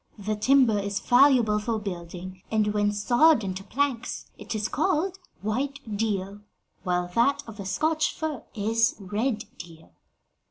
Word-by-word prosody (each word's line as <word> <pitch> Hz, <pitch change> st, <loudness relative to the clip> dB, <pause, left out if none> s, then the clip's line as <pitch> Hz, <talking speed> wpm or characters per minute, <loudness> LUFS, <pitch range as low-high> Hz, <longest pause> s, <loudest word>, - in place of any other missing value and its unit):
The 215 Hz, +1 st, -2 dB
timber 230 Hz, -1 st, +4 dB
is 200 Hz, 0 st, -2 dB
valuable 245 Hz, -4 st, +4 dB
for 225 Hz, +1 st, -1 dB
building; 185 Hz, -2 st, -7 dB
and 210 Hz, -1 st, +1 dB
when 205 Hz, 0 st, +2 dB
sawed 240 Hz, +6 st, +4 dB
into 190 Hz, 0 st, -4 dB
planks, 255 Hz, +2 st, -2 dB
it -, -, -6 dB
is 215 Hz, 0 st, -1 dB
called 370 Hz, +6 st, 0 dB, 0.2 s
white 265 Hz, +7 st, -2 dB, 0.2 s
deal, 200 Hz, -2 st, -2 dB, 0.4 s
while 180 Hz, -1 st, 0 dB
that 280 Hz, +6 st, +2 dB
of 225 Hz, -2 st, -10 dB
the 200 Hz, -2 st, -6 dB
Scotch 315 Hz, +9 st, +1 dB
fir 310 Hz, -4 st, -4 dB
is 225 Hz, +3 st, +2 dB
red 215 Hz, +3 st, -2 dB, 0.2 s
deal. 165 Hz, -, -12 dB
215 Hz, 145 wpm, -26 LUFS, 200-265 Hz, 0.4 s, timber